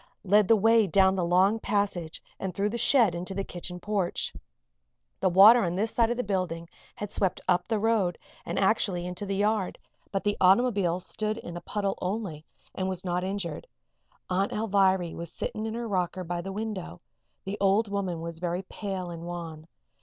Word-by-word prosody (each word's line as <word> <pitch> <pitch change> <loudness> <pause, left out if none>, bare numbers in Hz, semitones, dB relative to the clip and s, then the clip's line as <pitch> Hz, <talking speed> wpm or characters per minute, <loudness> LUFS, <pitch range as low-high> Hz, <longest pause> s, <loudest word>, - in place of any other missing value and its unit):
led 205 +1 +4
the 225 - +6
way 225 0 +4
down 190 +2 +4
the 185 - 0
long 185 +5 +3
passage 195 -7 -2 0.2
and 190 -2 -4
through 200 +1 +1
the - - -4
shed 235 -5 +4
into 180 +3 -5
the 195 - -1
kitchen 180 -1 -7
porch. 200 -2 -1 0.9
The 190 - +2
water 205 +6 +8
on 175 -1 -1
this 215 +4 0
side 230 -1 +2
of 240 - -1
the 250 - 0
building 180 -5 -2 0.3
had 205 -1 -6
swept 190 -3 0
up 180 -1 +2
the 220 - 0
road 210 -5 +1 0.3
and - - -4
actually 190 -3 +1
into 180 +3 -5
the 195 - -1
yard; 205 -1 0 0.3
but 195 - -1
the 205 0 0
automobile 190 -3 +4
stood 215 +3 -3
in 175 -6 -8
a 175 - -6
puddle 200 +2 -2
only 185 -5 -3 0.3
and 185 0 -2
was 185 0 -5
not 180 0 -1
injured. 190 -5 -4 0.6
Aunt 190 +2 0
Alviry 190 -5 +2
was 170 -1 -7
sitting 215 +1 -4
in 220 - -4
her 235 0 -3
rocker 185 -2 -1
by 175 0 -3
the 195 +2 -6
window. 200 - -5 0.4
The 195 +2 -5
old 200 +3 +3
woman 190 -4 -2
was 165 0 -6
very 175 +1 -2
pale 190 -2 -5
and 165 -1 -7
wan. 165 -2 -7
190 Hz, 190 wpm, -28 LUFS, 175-210 Hz, 0.9 s, water